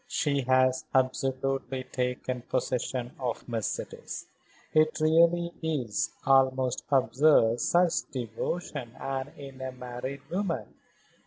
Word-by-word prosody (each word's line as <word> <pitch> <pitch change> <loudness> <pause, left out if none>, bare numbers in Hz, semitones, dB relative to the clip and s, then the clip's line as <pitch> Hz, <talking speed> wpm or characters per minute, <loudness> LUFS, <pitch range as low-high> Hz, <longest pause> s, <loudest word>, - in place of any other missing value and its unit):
"She 140 -2 +1
has 130 0 +3
absolutely 130 0 0
taken 125 0 -2
possession 125 0 -2
of 125 -3 -3
Mercedes. 115 -4 -4 0.5
It 155 0 +4
really 170 +2 +4
is 145 -10 -1 0.2
almost 130 -2 +3
absurd, 130 -3 +4
such 175 +3 +2
devotion, 125 +2 -4
and 135 0 -3
in 135 -2 -10
a 130 0 -3
married 125 +2 -6
woman. 185 -2 -2
130 Hz, 100 wpm, -29 LUFS, 125-145 Hz, 0.5 s, It